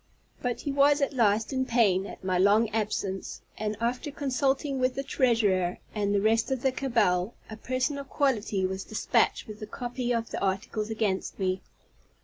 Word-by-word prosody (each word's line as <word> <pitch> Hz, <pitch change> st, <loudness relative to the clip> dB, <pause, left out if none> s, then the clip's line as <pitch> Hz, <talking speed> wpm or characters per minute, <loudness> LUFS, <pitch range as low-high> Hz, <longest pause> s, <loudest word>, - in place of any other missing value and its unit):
But 245 Hz, -1 st, -2 dB
he 285 Hz, -, -2 dB
was 285 Hz, +1 st, +4 dB
at 280 Hz, 0 st, 0 dB
last 220 Hz, -1 st, +2 dB
in 260 Hz, 0 st, +1 dB
pain 210 Hz, -7 st, +2 dB
at -, -, -10 dB
my 185 Hz, -1 st, +1 dB
long 210 Hz, +4 st, +4 dB
absence; 210 Hz, -3 st, -3 dB
and, 215 Hz, -1 st, -3 dB
after 245 Hz, +5 st, -1 dB
consulting 275 Hz, 0 st, 0 dB
with 255 Hz, 0 st, +1 dB
the 275 Hz, -, -2 dB
treasurer 210 Hz, -10 st, +2 dB, 0.2 s
and 205 Hz, -2 st, 0 dB
the 200 Hz, -, +2 dB
rest 225 Hz, +2 st, +2 dB
of 265 Hz, -2 st, -2 dB
the 265 Hz, -, +3 dB
cabal, 230 Hz, -7 st, +1 dB, 0.2 s
a -, -, -5 dB
person 255 Hz, +5 st, -1 dB
of 275 Hz, -1 st, -8 dB
quality 220 Hz, -9 st, +1 dB
was 190 Hz, +1 st, -3 dB
dispatched 220 Hz, +1 st, +1 dB
with 215 Hz, -1 st, -9 dB
the 215 Hz, -, -6 dB
copy 245 Hz, +2 st, -3 dB
of 230 Hz, -1 st, -1 dB
the -, -, -3 dB
articles 200 Hz, +3 st, -1 dB
against 215 Hz, -4 st, -1 dB
me. 185 Hz, -1 st, -1 dB
225 Hz, 180 wpm, -28 LUFS, 200-260 Hz, 0.2 s, was